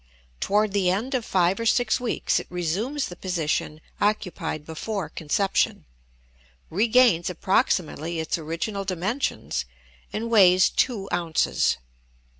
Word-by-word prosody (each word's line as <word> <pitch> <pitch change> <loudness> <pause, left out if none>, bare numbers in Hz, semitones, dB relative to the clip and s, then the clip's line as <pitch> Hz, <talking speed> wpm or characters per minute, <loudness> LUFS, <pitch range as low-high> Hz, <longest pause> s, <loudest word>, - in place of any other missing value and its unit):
Toward 210 - +1
the 195 -3 +2
end 220 +9 -1
of 255 -3 0
five 185 0 +1
or 230 - -2
six 245 0 +2
weeks 245 -2 0
it - - -8
resumes 195 - -2
the 175 - -8
position 165 -4 -2 0.2
occupied 180 -7 -1
before 190 +5 -4
conception, 190 +5 0 0.9
regains 220 -2 +4
approximately 170 -2 0
its 160 - -1
original 170 +6 -3
dimensions, 190 +8 -2 0.5
and 230 +2 -3
weighs 185 -4 +6
two 210 -7 0
ounces. 170 -2 +1
190 Hz, 115 wpm, -25 LUFS, 170-220 Hz, 0.9 s, weighs